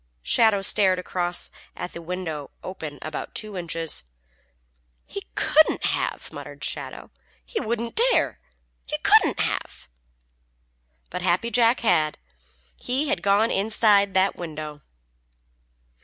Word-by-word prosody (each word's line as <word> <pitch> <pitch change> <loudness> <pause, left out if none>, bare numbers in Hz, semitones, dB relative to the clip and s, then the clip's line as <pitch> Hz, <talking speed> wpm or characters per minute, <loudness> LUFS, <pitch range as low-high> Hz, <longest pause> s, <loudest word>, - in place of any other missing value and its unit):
Shadow 205 - +3
stared 190 -1 +5
across 180 -1 -2 0.2
at 180 - -6
a 170 - -6
window 165 -4 -5
open 160 -6 -7
about 155 -1 -6
two 215 -2 -3
inches. 165 - -1 1.0
"He 400 - -8
couldn't 310 +1 +3
have!" - - -2
muttered - - -8
Shadow. - - -3 0.3
"He 465 - -3
wouldn't 235 - +1
dare. - - +1 0.5
He - - -2
couldn't - - +5
have!" 60 - -3 1.2
But 180 - -4
Happy 185 +6 +1
Jack 235 +1 +3
had. 155 -9 +2 0.6
He 270 +4 -2
had 175 - 0
gone 200 +4 +3
inside 200 -1 +3
that 190 +1 +3
window. 155 -3 -7
190 Hz, 115 wpm, -24 LUFS, 165-225 Hz, 1.2 s, stared